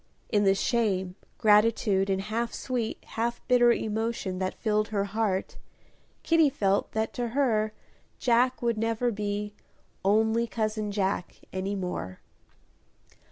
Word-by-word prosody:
In 205 Hz, -1 st, +2 dB
the 195 Hz, 0 st, +5 dB
shame, 195 Hz, -4 st, 0 dB, 0.2 s
gratitude, 210 Hz, -2 st, +3 dB
and 190 Hz, 0 st, +1 dB
half 230 Hz, +3 st, -2 dB
sweet, 245 Hz, -4 st, -2 dB
half 235 Hz, +1 st, -2 dB
bitter 240 Hz, -1 st, +5 dB
emotion 220 Hz, -4 st, -2 dB
that 185 Hz, 0 st, -2 dB
filled 215 Hz, -1 st, +1 dB
her 205 Hz, -2 st, -1 dB
heart, 200 Hz, -2 st, -1 dB, 0.7 s
Kitty 325 Hz, -3 st, +4 dB
felt 200 Hz, -7 st, 0 dB
that 220 Hz, 0 st, -1 dB
to 240 Hz, -1 st, -2 dB
her 220 Hz, -6 st, +2 dB, 0.5 s
Jack 245 Hz, +1 st, +2 dB
would 235 Hz, -2 st, +1 dB
never 230 Hz, +2 st, 0 dB
be 205 Hz, 0 st, -3 dB, 0.5 s
"only 220 Hz, +4 st, +2 dB
cousin 215 Hz, 0 st, -2 dB
Jack" 195 Hz, -3 st, -1 dB, 0.2 s
any 190 Hz, +2 st, -2 dB
more. 180 Hz, -, -4 dB
215 Hz, 125 wpm, -28 LUFS, 200-235 Hz, 0.7 s, the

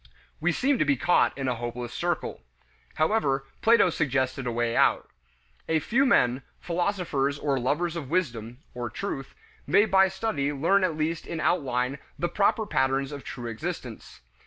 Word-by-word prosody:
We -, -, +2 dB
seem 275 Hz, 0 st, +1 dB
to -, -, +4 dB
be 145 Hz, -2 st, +2 dB
caught 175 Hz, +3 st, +2 dB
in 135 Hz, -1 st, -2 dB
a 125 Hz, -, +1 dB
hopeless 120 Hz, 0 st, -5 dB
circle. -, -, -2 dB, 0.5 s
However, 155 Hz, -6 st, +1 dB, 0.2 s
Plato 225 Hz, -5 st, +5 dB
suggested 130 Hz, -3 st, -1 dB
a -, -, 0 dB
way 120 Hz, 0 st, -1 dB
out. -, -, +3 dB, 0.6 s
A 160 Hz, -, +3 dB
few 250 Hz, -, +2 dB
men, 125 Hz, -, +3 dB, 0.2 s
philosophers 170 Hz, -6 st, -1 dB
or 140 Hz, -2 st, 0 dB
lovers 155 Hz, +7 st, 0 dB
of 150 Hz, -6 st, -5 dB
wisdom 120 Hz, -9 st, -2 dB, 0.2 s
or 120 Hz, -1 st, -4 dB
truth 135 Hz, -, -5 dB, 0.3 s
may 195 Hz, +8 st, +5 dB
by 190 Hz, -2 st, +5 dB
study 190 Hz, -7 st, -2 dB
learn 170 Hz, +8 st, +2 dB
at 170 Hz, -4 st, 0 dB
least 155 Hz, +1 st, -2 dB
in 165 Hz, -, -4 dB
outline 130 Hz, -5 st, 0 dB, 0.2 s
the 175 Hz, -, -1 dB
proper 215 Hz, +2 st, +1 dB
patterns 135 Hz, -5 st, 0 dB
of 140 Hz, -2 st, -7 dB
true 120 Hz, -, -7 dB
existence. 115 Hz, -2 st, -6 dB
145 Hz, 160 wpm, -27 LUFS, 130-180 Hz, 0.6 s, Plato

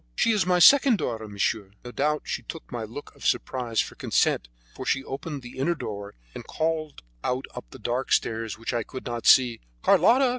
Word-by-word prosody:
She -, -, +3 dB
is 210 Hz, -5 st, +1 dB
my 180 Hz, -1 st, +4 dB
second 265 Hz, -, +7 dB
daughter, 110 Hz, -, -3 dB
monsieur." 100 Hz, -1 st, -2 dB
No 125 Hz, -, -6 dB
doubt 150 Hz, +4 st, 0 dB
she -, -, -3 dB
took 165 Hz, -, -9 dB
my 120 Hz, -2 st, -4 dB
look 120 Hz, +7 st, -9 dB
of -, -, -15 dB
surprise 120 Hz, -4 st, 0 dB
for -, -, -6 dB
consent, -, -, +1 dB, 0.3 s
for -, -, -7 dB
she 135 Hz, -, 0 dB
opened 140 Hz, +1 st, -6 dB
the 125 Hz, +1 st, -10 dB
inner 170 Hz, +6 st, +1 dB
door 100 Hz, -8 st, -6 dB, 0.2 s
and -, -, -7 dB
called 155 Hz, -, -3 dB, 0.2 s
out 125 Hz, +1 st, -1 dB
up 125 Hz, -, -8 dB
the -, -, -11 dB
dark 120 Hz, +3 st, -3 dB
stairs 110 Hz, -1 st, 0 dB
which 115 Hz, +2 st, -4 dB
I 120 Hz, -, 0 dB
could 130 Hz, +4 st, -8 dB
not 120 Hz, -2 st, -3 dB
see: 125 Hz, -3 st, +6 dB, 0.2 s
"Carlotta! 260 Hz, +2 st, +5 dB
130 Hz, 200 wpm, -26 LUFS, 115-155 Hz, 0.3 s, second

